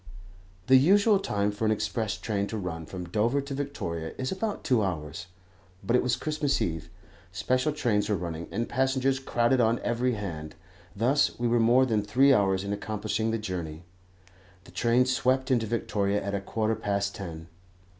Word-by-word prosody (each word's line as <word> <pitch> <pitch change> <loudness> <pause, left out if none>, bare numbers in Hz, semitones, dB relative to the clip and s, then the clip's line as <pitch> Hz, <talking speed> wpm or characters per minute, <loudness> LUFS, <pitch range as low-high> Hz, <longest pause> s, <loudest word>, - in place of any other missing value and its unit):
The 130 +3 +7
usual 200 - +5
time 105 - 0
for 105 +2 -6
an 110 - +3
express 110 0 -1
train 100 -2 -2
to 110 - -4
run 80 -5 -5
from 90 0 -7
Dover 115 +8 +1
to 140 0 -6
Victoria 95 - -4
is 130 0 -3
about 205 +2 -3
two 125 -5 +2
hours; 85 -1 -4 0.6
but 115 +5 +1
it - - +4
was 125 -1 +1
Christmas 150 +1 -1
Eve, 80 -1 -3 0.4
special 130 - 0
trains 110 -8 0
were 105 - +2
running, 85 -2 -5
and 115 +4 -2
passengers 135 +1 +1
crowded 125 -1 +1
on 115 +1 +3
every 120 +1 0
hand, 85 -8 -6 0.4
thus 130 +7 +2
we 120 - +1
were 120 0 +2
more 120 +3 +5
than 110 -4 +1
three 130 +7 +4
hours 95 -4 +2
in 100 0 -3
accomplishing 110 +1 -2
the 115 - 0
journey. 90 -6 -5 0.8
The - - -16
train 120 +1 +2
swept 130 +1 +1
into 115 -3 +2
Victoria 105 -3 0
at 100 0 -3
a 100 - -1
quarter 110 +2 -1
past 100 -2 -1
ten. 85 -6 -7
110 Hz, 175 wpm, -27 LUFS, 100-130 Hz, 0.8 s, The